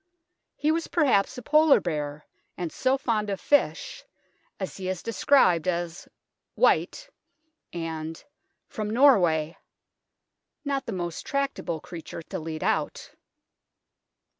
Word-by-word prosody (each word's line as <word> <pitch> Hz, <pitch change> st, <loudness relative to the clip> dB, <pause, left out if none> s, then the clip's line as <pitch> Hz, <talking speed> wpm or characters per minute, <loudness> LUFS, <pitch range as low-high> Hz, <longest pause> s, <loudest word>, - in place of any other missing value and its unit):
He 305 Hz, -, +1 dB
was 330 Hz, +1 st, -1 dB
perhaps 265 Hz, -, +2 dB
a 250 Hz, -, -7 dB
Polar 305 Hz, +2 st, +5 dB
bear, 150 Hz, -3 st, -4 dB, 0.3 s
and 175 Hz, -3 st, -3 dB
so 260 Hz, +1 st, +1 dB
fond 220 Hz, -5 st, -1 dB
of 195 Hz, -, -2 dB
fish, 290 Hz, -, +1 dB, 0.6 s
as 190 Hz, -, -4 dB
he 185 Hz, -1 st, -4 dB
is 185 Hz, -2 st, -4 dB
described 190 Hz, -, +3 dB
as 175 Hz, 0 st, -2 dB, 0.2 s
" -, -, -59 dB
white," -, -, +2 dB, 0.6 s
and 160 Hz, -1 st, -5 dB, 0.2 s
" -, -, -51 dB
from 215 Hz, -1 st, -2 dB
Norway 180 Hz, -, +4 dB, 0.5 s
" 305 Hz, -, -57 dB
not 275 Hz, -1 st, -2 dB
the -, -, -2 dB
most 175 Hz, -4 st, -4 dB
tractable 275 Hz, -, -2 dB
creature 165 Hz, +1 st, -9 dB
to -, -, -6 dB
lead 160 Hz, 0 st, -5 dB
out. -, -, -1 dB
190 Hz, 130 wpm, -26 LUFS, 165-270 Hz, 0.6 s, Polar